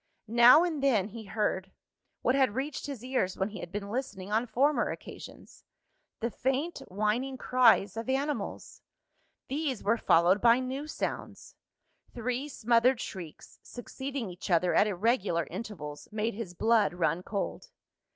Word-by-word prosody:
Now 240 +7 +7
and 325 -5 -2
then, 220 -8 +2
he 220 +1 -9
heard 195 -3 -1 0.5
what 250 - +3
had 265 -6 +2
reached 280 +2 -3
his 270 -5 -6
ears 250 -8 -1
when 190 +2 -1
he 205 -2 -8
had 175 - -8
been 200 0 -5
listening 210 -6 -4
on 225 +3 +1
former 280 +6 +2
occasions - - -10 0.6
the 235 +1 -1
faint 270 +9 -1
whining 215 +7 -1
cries 240 -6 +4
of 225 +3 -5
animals. 280 +3 -3 0.7
These 280 -4 -2
were 230 +4 +2
followed 175 +4 +4
by 235 +1 +6
new 265 +3 -4
sounds. - - -5 0.6
Three 250 +4 -2
smothered 240 0 +3
shrieks, 170 -5 -8
succeeding 265 0 -6
each 180 +3 -8
other 175 0 +3
at 210 - +4
irregular 195 -4 +1
intervals, 170 -7 -7
made 215 +2 -1
his 195 -4 -7
blood 220 -2 +3
run 170 0 0
cold. 200 - -4
230 Hz, 145 wpm, -29 LUFS, 200-260 Hz, 0.7 s, Now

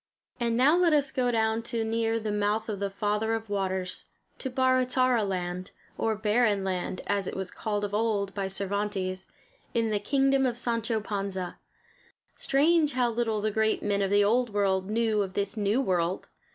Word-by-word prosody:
And 235 -1 0
now 275 +6 +5
let 350 -2 +4
us 285 -2 +2
go 255 -2 +1
down 225 -1 +1
to 230 0 -2
near 225 0 0
the 215 -1 -3
mouth 210 +2 0
of 205 -2 -3
the 200 0 -1
Father 210 +2 0
of 225 -2 -6
Waters, 190 -2 -2 0.3
to 265 - -3
"Barra 255 0 +3
Tarra 255 -3 +2
Land" 180 -1 -3 0.3
or 225 -1 0
Barren 210 -1 +2
Land, 185 -1 -2
as 200 -2 -1
it - - -4
was 190 -1 -3
called 210 -2 -3
of 205 0 -3
old 205 -2 0
by 195 -1 -2
Cervantes, 195 -1 -2 0.4
in 225 -1 +1
the 210 - +1
kingdom 270 +4 +2
of 240 -1 -2
Sancho 230 -2 -1
Panza. 195 -3 -4 0.8
Strange 300 +2 +2
how 245 -1 +1
little 225 -2 -1
the 215 +1 0
great 220 +1 +1
men 200 -1 +1
of 195 - +1
the 205 +1 +4
old 240 +4 +2
world 195 -2 0
knew 220 -1 +1
of 190 -2 -4
this 200 +1 -1
new 210 +3 +1
world! 180 -7 0
215 Hz, 185 wpm, -28 LUFS, 200-235 Hz, 0.8 s, now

